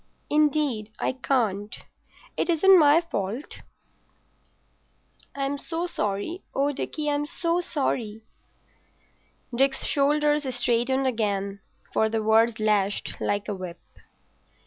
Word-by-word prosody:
"Indeed, 295 -7 +1
I - - 0
can't. 225 -6 -1 0.6
It - - -1
isn't 370 +3 +6
my 300 +2 +6
fault. 225 - -5 1.7
I'm 280 0 -2
so 330 +3 -3
sorry. 210 - -3
Oh, 280 +2 +2
Dickie, 300 +2 -4
I'm 290 0 0
so 340 +1 0
sorry." 230 -9 -2 1.3
Dick's 270 +2 +1
shoulders 295 0 +2
straightened 245 +2 +1
again, 200 -5 -1 0.3
for 220 - +2
the 220 0 -1
words 225 +1 +3
lashed 205 -2 0
like 205 0 -1
a 210 - -2
whip. 185 -3 -7
260 Hz, 105 wpm, -25 LUFS, 215-295 Hz, 1.7 s, isn't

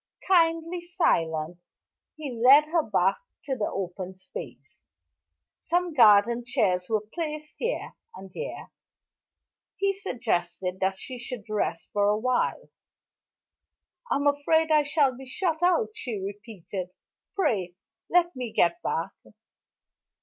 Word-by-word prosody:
Kindly 335 -1 +2
silent, 165 - 0 0.6
he 305 -4 -6
led 255 +6 +6
her 335 0 +3
back 195 - +1 0.3
to 270 - -1
the 215 -4 -1
open 185 0 -5
space. 140 - -10 0.8
Some 350 0 0
garden 235 -1 +5
chairs 205 -8 0
were 215 -2 +1
placed 305 -2 -5
here 480 +1 -2 0.2
and 190 0 -11
there; - - -6 1.1
he 395 0 +1
suggested 190 - -2
that 190 0 0
she 255 +3 -7
should 245 -2 -6
rest 215 -1 -2
for 205 -1 +2
a 210 - +2
while. 255 +3 0 1.4
"I'm 285 +1 0
afraid 315 +3 +2
I 305 -1 +6
shall 285 -2 +2
be 265 +1 -11
shut 325 +3 -1
out," 360 +5 +3
she 250 - -4
repeated. 195 -2 -6 0.5
"Pray 190 - 0 0.3
let 350 -2 +3
me 250 -3 -4
get 170 -4 +2
back." 165 +4 -2
245 Hz, 120 wpm, -27 LUFS, 190-320 Hz, 1.4 s, led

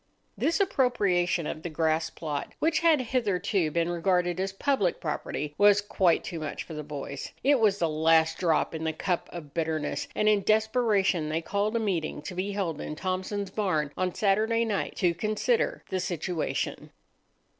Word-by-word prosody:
This 335 - +1
appropriation 200 - +2
of 155 - -4
the 175 - -4
grass 160 0 0
plot, 150 -3 -5
which 320 0 +2
had 325 -3 +4
hitherto 205 -8 0
been 170 +2 0
regarded 175 0 +1
as 190 +1 -1
public 200 -3 0
property, 150 -1 -3
was 205 0 +6
quite 190 -4 +2
too 170 - -5
much 155 - -4
for 165 - -10
the 150 - -4
boys. 140 -2 -6
It 280 -1 +4
was 210 -3 +3
the 170 - +1
last 160 +1 +3
drop 165 -3 +1
in 160 0 -4
the 160 0 -1
cup 175 +2 -2
of 155 -5 -9
bitterness, 160 - -2
and 215 - +1
in 210 -1 +4
desperation 215 -6 +2
they 160 +2 -1
called 205 +5 -1
a - - +2
meeting 175 -8 -2
to 180 - -6
be 190 +3 -3
held 175 -7 -2
in 150 - -5
Thompson's 190 +3 -3
barn 160 -9 0
on 185 -1 -1
Saturday 220 +3 +2
night 210 -3 -2
to 175 -3 +2
consider 455 - 0
the 185 - -1
situation. 175 -2 -3
185 Hz, 175 wpm, -28 LUFS, 160-215 Hz, -, was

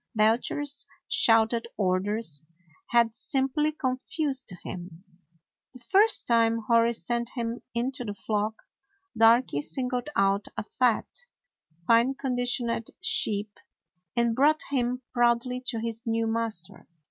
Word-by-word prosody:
Belcher's 250 +6 +1 0.2
shouted 230 0 +3
orders 190 -4 0 0.5
had 235 -1 +3
simply 270 +5 0
confused 265 0 -2
him. 175 -1 -8 0.7
The - - -11
first 400 - +3
time 230 -1 +3
Hori 230 0 +4
sent 235 +4 -2
him 235 0 -3
into 245 +2 -1
the 205 -3 -5
flock, 215 +1 -1 0.6
Darky 225 - +4
singled 250 - -3
out 195 +1 +2
a - - -2
fat, 240 +1 +1 0.8
fine 235 +5 +4
conditioned 245 -3 -1
sheep 210 - 0 0.6
and 235 -1 +2
brought 300 +4 +3
him 250 -1 0
proudly 240 +1 +2
to 235 - -1
his 230 0 -4
new 225 0 +1
master. 225 -5 -3
235 Hz, 110 wpm, -27 LUFS, 220-255 Hz, 0.8 s, Hori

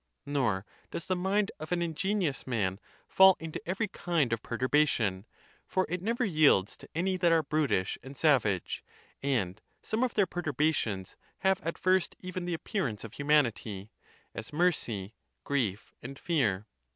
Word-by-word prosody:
Nor 120 -9 0 0.2
does 170 - -5
the 185 - 0
mind 195 +3 +1
of 155 +2 -7
an 175 -1 +1
ingenious 170 -2 -1
man 100 -6 0 0.3
fall 190 -1 +7
into 160 -1 -6
every 195 +5 0
kind 165 - 0
of 115 - -1
perturbation, 115 -7 +1 0.4
for 185 0 +1
it 180 +1 -2
never 235 +5 0
yields 155 - +4
to - - -14
any 185 +3 +1
that 175 -2 +3
are 165 -1 +4
brutish 140 -11 0
and 135 +1 -10
savage; 120 - +2 0.4
and 110 -9 -1 0.2
some 220 - -1
of 255 - -1
their 205 - +4
per 175 0 -4
turbations 145 - 0 0.3
have 190 0 +2
at 165 0 -3
first 185 -1 +2
even 185 -1 -5
the 175 -1 -1
appearance 160 - -3
of 115 - -8
humanity, 120 -8 +1 0.4
as 110 - -7
mercy, 125 - 0 0.3
grief, 110 -8 -1
and 135 +3 -8
fear. 115 - 0
150 Hz, 155 wpm, -30 LUFS, 115-180 Hz, 0.4 s, fall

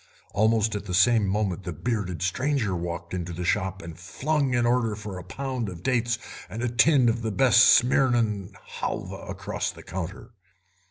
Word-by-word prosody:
Almost 110 +2 +2
at 105 0 -4
the 90 -3 -2
same 105 +2 +4
moment 100 -1 -1
the 90 - -4
bearded 95 -1 -3
stranger 130 +3 0
stalked 85 0 -5
into 90 -1 -4
the 90 +1 -4
shop, 95 0 -1
and 85 -1 -9
flung 135 - -1
an 120 -1 +2
order 120 -3 +1
for 100 -3 -7
a - - -9
pound 130 -1 -4
of 90 -2 -9
dates 120 -3 +1 0.3
and 115 +3 -5
a 120 - +1
tin 120 +3 +4
of 115 0 +1
the 110 - -2
best 125 +2 +5
Smyrna 120 -6 +2 0.3
halva - - -4
across - - -3
the - - -10
counter. 95 +5 -6
110 Hz, 175 wpm, -26 LUFS, 90-120 Hz, 0.3 s, best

